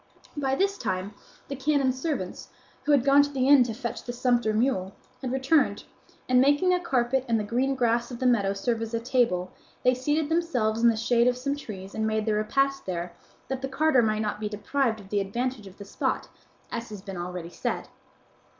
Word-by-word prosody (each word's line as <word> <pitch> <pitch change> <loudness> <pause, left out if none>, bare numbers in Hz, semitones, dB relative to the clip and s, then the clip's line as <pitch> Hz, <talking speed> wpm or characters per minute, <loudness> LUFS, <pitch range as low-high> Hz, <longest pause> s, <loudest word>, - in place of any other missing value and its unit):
By 270 -2 0
this 395 +5 0
time 185 +3 -3 0.3
the 275 - -4
canon's 270 -1 +1
servants, 265 - -3 0.4
who 300 - +2
had 280 -3 +4
gone 280 +1 +7
to 285 - 0
the 265 -2 0
inn 285 -1 +8
to 230 - -3
fetch 235 -1 -5
the 245 - -5
sumpter 240 -2 +1
mule, 215 -4 0 0.3
had 255 -3 -3
returned, 270 +3 +2 0.4
and 255 0 +5
making 290 +7 +4
a 360 - +2
carpet 265 -5 +1
and 230 -1 +2
the - - -1
green 255 +6 0
grass 235 -1 +1
of 245 - -6
the 255 - -3
meadow 205 -6 +3
serve 225 +3 -1
as 225 0 -3
a - - 0
table, 230 -7 +1 0.3
they 255 - +5
seated 295 +4 0
themselves 255 -10 0
in 235 - +6
the 225 - +1
shade 235 +1 +3
of 250 0 +2
some 280 +3 -2
trees 195 -8 -8
and 220 0 -1
made 220 -1 0
their 215 -2 +1
repast 275 +5 0
there, 175 -1 -3 0.3
that 265 -1 -3
the 270 - -3
carter 275 -1 +3
might 215 -1 +1
not 210 0 -3
be 210 -1 -3
deprived 220 +3 -1
of 195 -2 -13
the 205 - +1
advantage 235 +2 -3
of 190 - -14
the 200 - -9
spot, - - -2 0.4
as 235 0 -4
has 205 -3 -9
been 195 -1 -7
already 175 -1 -5
said. - - -3
240 Hz, 215 wpm, -27 LUFS, 215-270 Hz, 0.4 s, inn